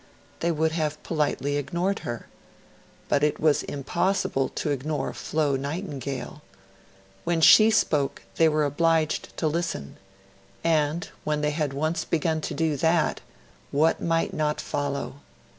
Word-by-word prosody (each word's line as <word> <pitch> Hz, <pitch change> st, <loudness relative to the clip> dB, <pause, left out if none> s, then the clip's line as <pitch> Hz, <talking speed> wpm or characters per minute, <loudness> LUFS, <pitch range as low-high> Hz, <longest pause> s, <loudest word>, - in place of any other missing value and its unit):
They 170 Hz, -, +1 dB
would 160 Hz, 0 st, +1 dB
have 155 Hz, -2 st, -2 dB
politely 145 Hz, -3 st, 0 dB
ignored 175 Hz, +7 st, -1 dB
her; 120 Hz, -1 st, -5 dB, 0.8 s
but 145 Hz, -, +2 dB
it 150 Hz, -, +1 dB
was 155 Hz, -2 st, +3 dB
impossible 145 Hz, 0 st, -1 dB
to 150 Hz, -, -2 dB
ignore 145 Hz, +2 st, -2 dB
Flo 150 Hz, -3 st, 0 dB
Nightingale. 140 Hz, -2 st, -4 dB, 0.8 s
When 170 Hz, -1 st, +1 dB
she 215 Hz, +7 st, +8 dB
spoke, 150 Hz, -10 st, +1 dB
they 165 Hz, -1 st, +5 dB
were 155 Hz, -1 st, +2 dB
obliged 160 Hz, +2 st, +1 dB
to 160 Hz, -, +1 dB
listen; 155 Hz, -, -3 dB, 0.7 s
and, 160 Hz, 0 st, +1 dB, 0.2 s
when 150 Hz, -1 st, -1 dB
they 150 Hz, 0 st, +1 dB
had 150 Hz, -2 st, -1 dB
once 155 Hz, +4 st, -1 dB
begun 160 Hz, -1 st, 0 dB
to -, -, -4 dB
do 160 Hz, -3 st, 0 dB
that 160 Hz, +2 st, +2 dB, 0.5 s
what 155 Hz, +3 st, +2 dB
might 165 Hz, 0 st, 0 dB
not 150 Hz, -1 st, 0 dB
follow? 140 Hz, -1 st, -3 dB
155 Hz, 135 wpm, -26 LUFS, 145-165 Hz, 0.8 s, she